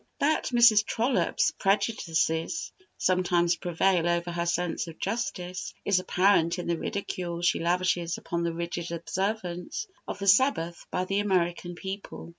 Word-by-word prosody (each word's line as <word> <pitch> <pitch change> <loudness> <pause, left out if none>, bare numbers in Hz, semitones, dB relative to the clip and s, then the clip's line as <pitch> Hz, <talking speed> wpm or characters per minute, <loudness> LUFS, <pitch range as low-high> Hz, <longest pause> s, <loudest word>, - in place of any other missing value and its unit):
That 305 +3 +1
Mrs. 235 -4 +6
Trollope's 225 -5 +1
prejudices 195 - 0 0.3
sometimes 175 -2 +2
prevail 175 0 +1
over 170 0 0
her 170 0 -2
sense 175 0 -1
of 165 -1 -9
justice 190 -4 -4
is 200 -2 +3
apparent 185 -2 +3
in 175 - -4
the 170 -1 -1
ridicule 175 -3 -4
she 170 - +3
lavishes 175 0 0
upon 170 0 -3
the 170 0 0
rigid 170 0 -4
observance 180 - -3 0.2
of - - -4
the 200 - -5
Sabbath 190 -5 +3
by 180 - -1
the 195 +2 0
American 175 -3 0
people. 190 0 -7
180 Hz, 140 wpm, -27 LUFS, 170-200 Hz, 0.3 s, Mrs